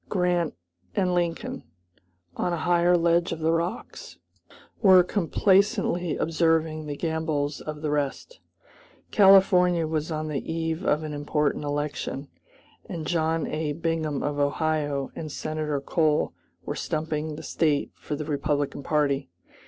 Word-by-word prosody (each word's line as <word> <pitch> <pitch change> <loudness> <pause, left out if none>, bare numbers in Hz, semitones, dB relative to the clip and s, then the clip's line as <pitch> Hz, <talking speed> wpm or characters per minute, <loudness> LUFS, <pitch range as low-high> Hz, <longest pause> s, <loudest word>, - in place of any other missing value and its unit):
Grant 180 -4 +1 0.4
and 180 -2 +1
Lincoln, 170 -1 -2 0.7
on 175 - -1
a - - -1
higher 175 0 +4
ledge 170 +1 +2
of 165 - -2
the 160 +1 +1
rocks, 170 +7 -3 0.6
were 190 -4 +7
complacently 190 -1 +2
observing 160 -1 +1
the 145 -1 -4
gambols 160 -3 -1
of 150 0 -7
the 150 - 0
rest. 145 - -2 0.7
California 185 -4 +5
was 155 0 -2
on 155 0 -2
the 150 -3 -2
eve 165 +1 -2
of 150 -2 +1
an 155 -1 -5
important 145 0 -1
election, 145 -1 -3 0.6
and 165 -2 -5
John 160 0 0
A. 155 -1 -2
Bingham 160 -2 -2
of 145 0 -2
Ohio 145 -1 0
and 155 -2 -6
Senator 155 -2 -2
Cole 155 +1 +1 0.3
were - - -2
stumping 155 0 -3
the 155 - -9
State 150 -3 0
for 150 - -5
the 150 +1 -5
Republican 145 -1 -1
party. 145 -2 0
160 Hz, 135 wpm, -26 LUFS, 150-170 Hz, 0.7 s, were